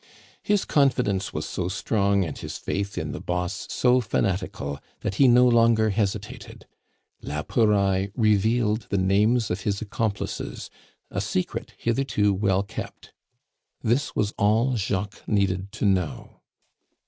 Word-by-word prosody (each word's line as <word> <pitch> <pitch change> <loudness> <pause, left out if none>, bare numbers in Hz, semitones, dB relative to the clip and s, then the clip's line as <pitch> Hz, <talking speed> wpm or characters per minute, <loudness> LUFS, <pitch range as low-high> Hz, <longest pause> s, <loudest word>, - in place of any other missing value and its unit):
His 205 -1 +1
confidence 125 -9 +1
was - - -4
so 90 - -3
strong, 100 0 +1
and 80 - -5
his - - -6
faith 100 +1 -3
in - - -3
the - - -6
boss 90 0 -3
so 125 0 +3
fanatical, 90 - -2 0.2
that - - -2
he 135 - +8
no 125 +1 +6
longer 115 -2 +4
hesitated. 100 -1 -3 0.6
La 75 +1 -4
Pouraille 100 -4 +2
revealed 110 0 +2
the 100 - 0
names 105 +5 +2
of 90 +3 -2
his 100 0 -1
accomplices, 110 -1 -4 0.4
a - - -2
secret 90 - -3
hitherto 115 -4 +1
well 95 0 +1
kept. 100 - -8 0.7
This 120 +5 0
was 105 0 0
all 115 +5 +3
Jacques 100 -1 -2
needed 100 -2 0
to - - -2
know. 95 -5 -1
100 Hz, 135 wpm, -25 LUFS, 95-115 Hz, 0.7 s, he